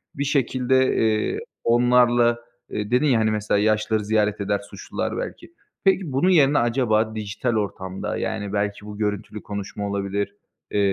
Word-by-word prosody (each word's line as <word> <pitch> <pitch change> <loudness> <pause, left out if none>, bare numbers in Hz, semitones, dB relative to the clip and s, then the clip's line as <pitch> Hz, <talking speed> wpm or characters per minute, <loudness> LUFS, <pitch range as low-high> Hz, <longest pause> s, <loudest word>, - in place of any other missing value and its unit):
bir 140 - -1
şekilde, 130 -2 +2
eee, 110 - +1 0.2
onlarla, 120 0 +4 0.3
eee, 105 +1 -4
dedin, 125 +4 +3
ya, 130 -6 +4
hani, 110 0 +2
mesela 105 -1 0
yaşlıları 110 0 +1
ziyaret 105 -1 +1
eder 100 0 0
suçlular - - -4
belki. - - -6 0.3
Peki, 190 -6 +2
bunun 140 +8 +2
yerine 150 -5 +5
acaba 115 -2 +1
dijital 110 +3 -2
ortamda, 95 -3 -3
yani, 100 -1 -3
belki 105 0 -2
bu 105 -1 -8
görüntülü 105 0 -3
konuşma 100 0 -5
olabilir, 100 0 -2 0.4
eee, 105 - 0
110 Hz, 150 wpm, -23 LUFS, 105-125 Hz, 0.4 s, yerine